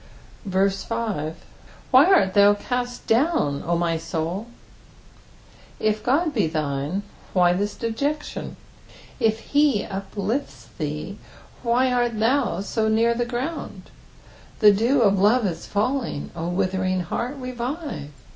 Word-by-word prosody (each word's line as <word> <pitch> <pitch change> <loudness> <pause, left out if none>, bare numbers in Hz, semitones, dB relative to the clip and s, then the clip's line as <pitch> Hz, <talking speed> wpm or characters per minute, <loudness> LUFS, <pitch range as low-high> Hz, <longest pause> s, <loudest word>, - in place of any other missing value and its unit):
6. 190 -2 -5 0.3
" - - -19
ffSy 210 -10 -2 0.6
art 280 - +6
thou 205 0 +6
ciut 245 +3 -3
doom, 230 - +2
0 170 +1 -1
my 170 -1 0
xnilt" 165 +6 -3 1.3
If 215 0 0
God 295 +7 +1
be 210 - +2
thine, 155 +3 -2 0.3
why 180 -2 +4
this 205 +3 -2
dejection? 280 +7 -3 0.6
If 225 -2 0
he 285 -7 +4
uplifts 195 - -4
thee, 150 +6 -4 0.4
why 250 +2 +2
art 240 -2 +1
thou 245 -1 +1
so 220 +2 -1
near 225 +2 +3
the 240 +1 -1
ground? 255 +7 -5 0.7
The 210 -2 +8
dew 235 +6 +3
of 200 -2 +3
love 215 +4 +4
is 175 -4 -3
falling, 230 - -1
0 170 0 -4
witnering 185 0 0
heart, 240 - -3
revive. 255 - -5
215 Hz, 125 wpm, -23 LUFS, 185-250 Hz, 1.3 s, The